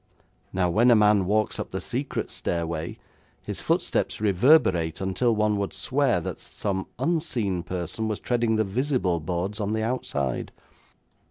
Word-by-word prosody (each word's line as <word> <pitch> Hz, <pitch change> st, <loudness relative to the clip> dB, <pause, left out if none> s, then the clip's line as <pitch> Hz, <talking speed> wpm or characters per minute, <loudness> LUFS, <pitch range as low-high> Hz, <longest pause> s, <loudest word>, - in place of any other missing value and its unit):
Now, 90 Hz, -1 st, +1 dB
when 110 Hz, +8 st, +4 dB
a 120 Hz, -, +7 dB
man 105 Hz, -3 st, +4 dB
walks 105 Hz, +2 st, +1 dB
up -, -, -4 dB
the -, -, -4 dB
secret -, -, -3 dB
stairway, 85 Hz, -1 st, -3 dB, 0.5 s
his -, -, -4 dB
footsteps -, -, 0 dB
reverberate 100 Hz, -, +3 dB
until 105 Hz, +5 st, +1 dB
one 105 Hz, -1 st, +2 dB
would 100 Hz, -, -2 dB
swear -, -, +1 dB
that -, -, -5 dB
some 95 Hz, -2 st, -3 dB
unseen 125 Hz, -, 0 dB
person 90 Hz, +5 st, -3 dB
was 110 Hz, -2 st, -2 dB
treading 120 Hz, -2 st, +1 dB
the 110 Hz, -, +2 dB
visible 110 Hz, -, 0 dB
boards 90 Hz, +6 st, -3 dB
on 105 Hz, 0 st, -1 dB
the 110 Hz, 0 st, 0 dB
outside.' 70 Hz, -, -2 dB
105 Hz, 150 wpm, -26 LUFS, 90-115 Hz, 0.5 s, a